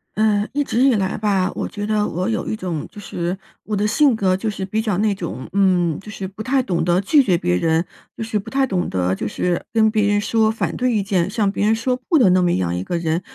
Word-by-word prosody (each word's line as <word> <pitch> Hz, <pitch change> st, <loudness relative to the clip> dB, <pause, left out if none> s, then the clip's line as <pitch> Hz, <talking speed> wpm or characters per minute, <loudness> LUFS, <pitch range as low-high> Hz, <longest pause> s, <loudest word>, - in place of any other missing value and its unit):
呃， 210 Hz, 0 st, +2 dB
一 290 Hz, +1 st, 0 dB
直 240 Hz, -, -2 dB
以 270 Hz, -3 st, +5 dB
来 195 Hz, -2 st, -1 dB
吧， 200 Hz, -3 st, +1 dB
我 -, -, -3 dB
觉 205 Hz, -1 st, -5 dB
得 210 Hz, 0 st, +1 dB
我 180 Hz, +3 st, -2 dB
有 225 Hz, -, -2 dB
一 -, -, -1 dB
种， 180 Hz, -7 st, -4 dB
就 -, -, -11 dB
是 180 Hz, -2 st, -4 dB, 0.3 s
我 210 Hz, -, -2 dB
的 205 Hz, -, 0 dB
性 260 Hz, +4 st, +3 dB
格 190 Hz, -4 st, +1 dB
就 215 Hz, +4 st, -2 dB
是 195 Hz, -2 st, -4 dB
比 215 Hz, +3 st, -1 dB
较 215 Hz, -5 st, -1 dB
那 210 Hz, 0 st, +2 dB
种， 170 Hz, -9 st, -6 dB
嗯， 180 Hz, -5 st, +2 dB
就 205 Hz, -, -12 dB
是 200 Hz, -3 st, -5 dB
不 200 Hz, +3 st, -10 dB
太 260 Hz, +2 st, +1 dB
懂 175 Hz, -8 st, -1 dB
得 175 Hz, +1 st, +2 dB
拒 280 Hz, +8 st, +4 dB
绝 185 Hz, -8 st, +2 dB
别 90 Hz, -, 0 dB
人， 160 Hz, -, +1 dB, 0.3 s
就 -, -, -4 dB
是 220 Hz, -1 st, -1 dB
不 195 Hz, -, -8 dB
太 270 Hz, 0 st, +1 dB
懂 185 Hz, -7 st, -1 dB
得 90 Hz, 0 st, 0 dB
就 100 Hz, -, -3 dB
是 175 Hz, +10 st, -1 dB
跟 220 Hz, -1 st, +3 dB
别 215 Hz, -2 st, +2 dB
人 205 Hz, 0 st, +2 dB
说 220 Hz, +1 st, +2 dB
反 220 Hz, -, -2 dB
对 250 Hz, 0 st, 0 dB
意 210 Hz, -4 st, +1 dB
见， 190 Hz, -3 st, 0 dB
向 205 Hz, -1 st, 0 dB
别 205 Hz, -, -1 dB
人 220 Hz, -, +4 dB
说 250 Hz, +3 st, 0 dB
不 330 Hz, -, +5 dB
的 225 Hz, -10 st, +5 dB
那 185 Hz, 0 st, +4 dB
么 175 Hz, -1 st, +2 dB
样 90 Hz, -2 st, -1 dB
一 90 Hz, -, -3 dB
个 175 Hz, -, -2 dB
人。 165 Hz, 0 st, -1 dB
200 Hz, 290 characters per minute, -20 LUFS, 180-220 Hz, 0.3 s, 以